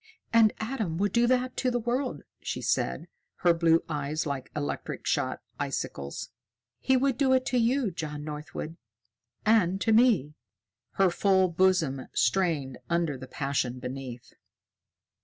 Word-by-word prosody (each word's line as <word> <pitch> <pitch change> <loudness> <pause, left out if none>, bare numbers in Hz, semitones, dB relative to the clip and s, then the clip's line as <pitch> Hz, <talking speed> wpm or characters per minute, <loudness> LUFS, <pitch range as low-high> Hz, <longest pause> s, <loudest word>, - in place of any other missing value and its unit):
"And 225 -2 +6
Adam 220 -8 -2
would 200 +1 +1
do 235 +2 +3
that 255 0 +1
to 255 - +1
the 245 - 0
world," 245 +3 -2 0.2
she - - -4
said, - - -1 0.4
her 175 - +7
blue 165 0 +3
eyes 150 0 -2
like 140 -3 -4
electric 145 -1 -4
shot - - -1 0.2
icicles. 70 0 -4 0.5
"He 265 0 +3
would 265 -1 +1
do 265 -2 +4
it 260 0 +3
to 250 - +4
you, 240 -1 +2
John 150 -3 -5
Northwood 155 +2 -6 0.7
and 200 -4 +3
to 225 - +2
me!" 220 - +4 0.6
Her 195 -2 +3
full 190 0 +3
bosom 170 -7 +2
strained 145 -2 +1
under 170 -4 +1
the 130 0 -9
passion 135 -3 -2
beneath. 125 -1 -7
175 Hz, 140 wpm, -28 LUFS, 145-230 Hz, 0.7 s, her